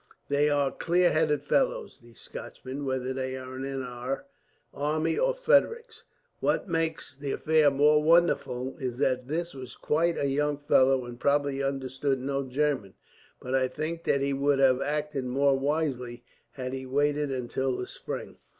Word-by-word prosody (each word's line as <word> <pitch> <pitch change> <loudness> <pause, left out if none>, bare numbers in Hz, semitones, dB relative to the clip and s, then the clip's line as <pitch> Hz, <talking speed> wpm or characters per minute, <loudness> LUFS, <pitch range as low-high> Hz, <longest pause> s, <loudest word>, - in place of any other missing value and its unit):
"They 145 +1 +3
are 145 -2 +2
clear 175 +1 +2
headed 150 -2 +1
fellows, - - 0
these 120 -2 -16
Scotchmen; 135 +2 -7
whether 130 -1 -1
they 130 0 -3
are 130 0 -8
in 135 0 -3
our 125 +2 -4 0.5
army 155 +3 0
or - - +1
Frederick's. 465 -2 +1 0.3
What - - 0
makes 160 -5 -2
the 140 0 -4
affair 155 -2 +4
more 150 +2 +4
wonderful 150 -6 +2
is 125 -2 -3
that 125 -1 0
this 170 +4 -2
was 130 -2 -9
quite 165 +2 +1
a - - 0
young 145 +1 0
fellow, 135 -2 +3
and 120 0 -9
probably 140 0 +1
understood 135 0 -1
no 135 +1 -1
German; 135 -6 -1 0.4
but 125 - -5
I 130 -1 +3
think 155 +5 -4
that 140 - +2
he 140 0 0
would 140 +1 +2
have 135 -1 +4
acted 150 -2 -2
more 135 +2 +2
wisely, 135 -4 -2 0.3
had 130 -1 -5
he 130 0 -5
waited 145 +2 +1
until 130 0 -2
the 125 - -3
spring." - - -7
140 Hz, 160 wpm, -28 LUFS, 130-150 Hz, 0.5 s, affair